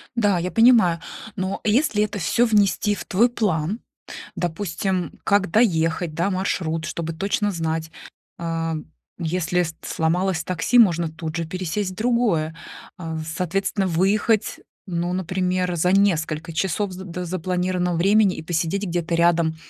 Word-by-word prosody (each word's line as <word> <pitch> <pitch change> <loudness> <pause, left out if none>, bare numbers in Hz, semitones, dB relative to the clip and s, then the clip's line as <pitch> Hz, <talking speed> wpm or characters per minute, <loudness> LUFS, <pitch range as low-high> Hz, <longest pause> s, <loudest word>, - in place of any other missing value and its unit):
Да, 205 -6 +2
я 180 +2 -3
понимаю. 225 -8 +5 0.4
Но 190 0 -2
если 215 -1 +3
это 210 -1 -3
всё 235 +7 +2
внести 210 -1 +2
в - - -7
твой 225 +6 +3
план, 200 -4 -1 0.6
допустим, 175 0 -2
как 200 -2 +2
доехать, 165 -6 +2
да, 170 +5 0
маршрут, 175 -4 -1
чтобы 165 0 -4
точно 200 +4 0
знать, 160 -2 -3 0.5
а, 165 -1 -2 0.4
если 180 +1 0
с 165 -1 -5
сломалось 175 +2 0
такси, 185 +7 +1
можно 170 -7 +4
тут 160 0 -6
же 165 - -2
пересесть 185 +3 -3
в - - -10
другое, 215 -9 +1 0.4
а, 165 -2 -5
соответственно, 190 +4 -1
выехать, 200 +5 +1 0.3
ну, 175 -1 -2
например, 185 0 -1
за 180 +2 +2
несколько 165 -4 +1
часов 190 +4 -1
з 180 - -8
до 180 -1 -5
запланированного 180 0 -1
времени 200 +2 +4
и - - -6
посидеть 175 +4 -1
где-то 170 -2 -1
рядом 170 -1 +3
180 Hz, 140 wpm, -23 LUFS, 165-200 Hz, 0.6 s, понимаю